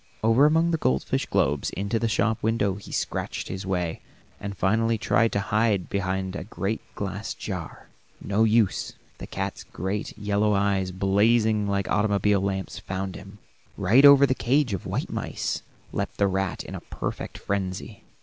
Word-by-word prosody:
Over 115 Hz, +6 st, +5 dB
among 165 Hz, +2 st, +3 dB
the 165 Hz, -, 0 dB
goldfish 65 Hz, -, 0 dB
globes 70 Hz, 0 st, +1 dB
into 100 Hz, +4 st, -2 dB
the 115 Hz, -, 0 dB
shop 110 Hz, +1 st, +1 dB
window 110 Hz, -3 st, +1 dB
he 100 Hz, 0 st, -10 dB
scratched -, -, -3 dB
his 95 Hz, +1 st, -5 dB
way, 90 Hz, -3 st, -1 dB, 0.4 s
and 100 Hz, -1 st, -6 dB
finally 110 Hz, +5 st, +2 dB
tried 115 Hz, +1 st, +2 dB
to 100 Hz, -, +1 dB
hide 105 Hz, -1 st, +1 dB
behind 95 Hz, -1 st, -2 dB
a -, -, -4 dB
great 105 Hz, +2 st, -3 dB
glass 100 Hz, +1 st, -4 dB
jar. -, -, -6 dB, 0.3 s
No 100 Hz, +2 st, +1 dB
use; 110 Hz, -2 st, +2 dB, 0.3 s
the -, -, -7 dB
cat's -, -, -4 dB
great, 95 Hz, +4 st, -4 dB
yellow 105 Hz, 0 st, +1 dB
eyes, 100 Hz, -2 st, +1 dB
blazing 105 Hz, +3 st, +2 dB
like 100 Hz, -1 st, 0 dB
automobile 105 Hz, -1 st, +2 dB
lamps, 95 Hz, -1 st, -3 dB
found 95 Hz, 0 st, -4 dB
him. 100 Hz, +2 st, -11 dB, 0.4 s
Right 105 Hz, +8 st, +5 dB
over 140 Hz, -1 st, +9 dB
the 130 Hz, -, +2 dB
cage 130 Hz, -1 st, +1 dB
of 95 Hz, -, -4 dB
white -, -, -2 dB
mice -, -, -3 dB, 0.3 s
leaped -, -, -3 dB
the 100 Hz, -, +3 dB
rat 95 Hz, -1 st, -1 dB
in -, -, -9 dB
a -, -, -6 dB
perfect -, -, -5 dB
frenzy. 95 Hz, -2 st, -4 dB
100 Hz, 165 wpm, -26 LUFS, 95-110 Hz, 0.4 s, over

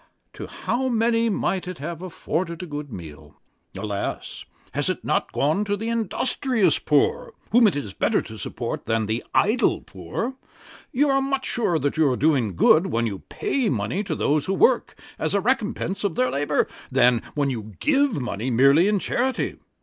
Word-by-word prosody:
To -, -, -7 dB
how 260 Hz, +2 st, -2 dB
many 230 Hz, 0 st, +2 dB
might 190 Hz, -3 st, -1 dB
it 180 Hz, -1 st, -5 dB
have 165 Hz, +3 st, -6 dB
afforded 170 Hz, -1 st, -3 dB
a -, -, -4 dB
good 145 Hz, -3 st, -6 dB
meal. 75 Hz, -6 st, -10 dB, 0.4 s
Alas! 105 Hz, -2 st, -4 dB, 0.3 s
has -, -, 0 dB
it -, -, -3 dB
not -, -, 0 dB
gone 155 Hz, +8 st, +1 dB
to 205 Hz, 0 st, -1 dB
the 225 Hz, +3 st, -3 dB
industrious 230 Hz, -, +1 dB
poor, 145 Hz, -2 st, +1 dB, 0.2 s
whom 235 Hz, 0 st, +6 dB
it 195 Hz, -, +1 dB
is 110 Hz, -9 st, -4 dB
better -, -, +1 dB
to -, -, -9 dB
support -, -, -4 dB
than 110 Hz, -1 st, +1 dB
the 110 Hz, +3 st, -2 dB
idle 225 Hz, +2 st, +3 dB
poor? 95 Hz, -, -5 dB, 0.6 s
You 290 Hz, +4 st, +2 dB
are 270 Hz, 0 st, +3 dB
much 270 Hz, 0 st, -1 dB
surer 205 Hz, -9 st, 0 dB
that 145 Hz, -1 st, -1 dB
you 155 Hz, -3 st, +4 dB
are 125 Hz, -, 0 dB
doing 130 Hz, -, +2 dB
good 160 Hz, -, +5 dB
when 115 Hz, -9 st, 0 dB
you 100 Hz, -4 st, -3 dB
pay 265 Hz, -4 st, 0 dB
money 115 Hz, -, -1 dB
to -, -, -2 dB
those 150 Hz, 0 st, +1 dB
who 195 Hz, -, 0 dB
work, 245 Hz, +4 st, +2 dB, 0.2 s
as 160 Hz, -, -1 dB
the 200 Hz, -, +3 dB
recompence 215 Hz, -3 st, -1 dB
of 195 Hz, -5 st, -1 dB
their 125 Hz, 0 st, +1 dB
labour, 140 Hz, +2 st, +1 dB, 0.2 s
than 125 Hz, -2 st, +4 dB
when 140 Hz, -2 st, +1 dB
you 110 Hz, -4 st, -6 dB
give 285 Hz, -, +2 dB
money 120 Hz, -1 st, -3 dB
merely 140 Hz, -, +5 dB
in 210 Hz, 0 st, +2 dB
charity. 255 Hz, +6 st, -1 dB
165 Hz, 180 wpm, -24 LUFS, -, 0.6 s, whom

